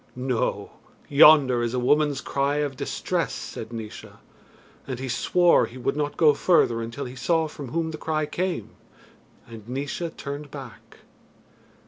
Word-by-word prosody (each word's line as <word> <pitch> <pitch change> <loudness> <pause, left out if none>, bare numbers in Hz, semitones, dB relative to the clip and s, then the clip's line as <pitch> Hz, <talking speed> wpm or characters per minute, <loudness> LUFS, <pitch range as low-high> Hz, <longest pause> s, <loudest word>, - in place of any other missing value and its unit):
"No! 125 -2 -2 0.4
yonder 140 -4 +7
is 120 +1 -1
a - - +1
woman's 145 +2 +2
cry 140 +1 -1
of 145 -2 -1
distress," - - -2
said 110 +1 -7
Naois, 110 -2 -8 0.7
and 130 -3 -4
he 130 +1 -5
swore 175 +8 +3
he 125 - -12
would 130 +2 -1
not 145 -1 -2
go 155 -3 +6
further 140 -7 +2
until 115 +5 -5
he 125 +1 -8
saw 160 +5 +1
from 145 -2 -8
whom 160 +5 -2
the 155 - -7
cry 155 -1 -1
came, 180 +3 -3 0.8
and 115 -1 -11
Naois 145 +6 -3
turned 145 +1 -6
back. 135 -5 -11
140 Hz, 150 wpm, -25 LUFS, 125-150 Hz, 0.8 s, yonder